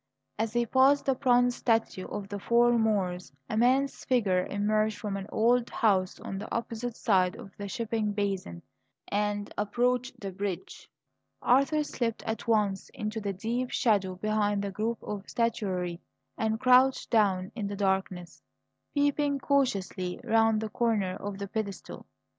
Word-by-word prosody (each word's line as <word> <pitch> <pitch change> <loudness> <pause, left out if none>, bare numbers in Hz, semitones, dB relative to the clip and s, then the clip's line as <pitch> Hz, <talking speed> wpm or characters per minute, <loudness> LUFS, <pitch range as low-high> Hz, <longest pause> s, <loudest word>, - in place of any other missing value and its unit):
As 220 0 -1
he 240 0 +2
passed 270 +4 +4
the 270 - +3
bronze 245 -2 +3
statue 225 -5 0
of 200 -1 -5
the 205 0 -5
"Four 240 +3 +4
Moors," 190 -6 0 0.2
a - - -3
man's 260 +4 +2
figure 195 -8 +1
emerged 215 +1 0
from 205 -1 -4
an 195 0 -5
old 240 +2 +2
house 190 -4 +1
on 195 - -5
the 215 - -8
opposite 230 0 -3
side 185 -5 +2
of 195 - -11
the 205 - -6
shipping 225 -1 -2
basin 195 - -3 0.5
and 205 0 -1
approached 245 +4 0
the 195 -1 -5
bridge. 190 -1 -5 0.5
Arthur 275 +4 +3
slipped 235 -6 -3
at 225 +1 -4
once 210 -4 +1
into 215 +1 -3
the 200 -1 -2
deep 235 +6 -2
shadow 195 -5 +1
behind 205 +1 0
the 200 - -3
group 225 +4 -2
of 205 -1 -6
statuary 185 -7 -1 0.4
and 220 0 -1
crouched 255 +1 +4
down 195 -5 +2
in 210 -4 -3
the 200 - -4
darkness, 190 -3 -2 0.5
peeping 285 0 +2
cautiously 200 -10 0
round 225 -1 +3
the 220 - -3
corner 210 -6 0
of 200 -1 -6
the 200 0 -5
pedestal. 200 -2 -5
215 Hz, 155 wpm, -29 LUFS, 195-240 Hz, 0.5 s, passed